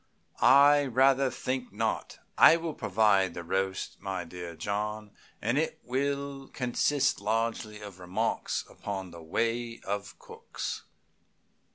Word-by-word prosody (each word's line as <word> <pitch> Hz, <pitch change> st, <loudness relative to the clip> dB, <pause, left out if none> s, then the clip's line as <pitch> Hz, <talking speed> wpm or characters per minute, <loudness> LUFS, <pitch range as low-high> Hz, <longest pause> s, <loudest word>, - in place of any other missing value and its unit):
"I 145 Hz, +1 st, +6 dB
rather 135 Hz, +2 st, +4 dB
think 130 Hz, 0 st, -3 dB
not. 110 Hz, +2 st, -2 dB, 0.2 s
I 165 Hz, -, +8 dB
will 165 Hz, -1 st, -4 dB
provide 100 Hz, -5 st, +2 dB
the 85 Hz, -, -5 dB
roast, 95 Hz, +2 st, -2 dB
my 95 Hz, -2 st, -3 dB
dear 85 Hz, 0 st, -8 dB
John, 105 Hz, +3 st, -3 dB, 0.3 s
and 120 Hz, +6 st, +1 dB
it 160 Hz, 0 st, -2 dB
will 140 Hz, +1 st, -2 dB
consist 130 Hz, 0 st, 0 dB
largely 110 Hz, 0 st, -1 dB
of 100 Hz, -3 st, -10 dB
remarks 90 Hz, 0 st, -2 dB
upon 95 Hz, -3 st, -6 dB
the 85 Hz, 0 st, -10 dB
ways 115 Hz, +7 st, -1 dB
of 100 Hz, 0 st, -4 dB
cooks." -, -, -7 dB
110 Hz, 125 wpm, -29 LUFS, 95-135 Hz, 0.3 s, I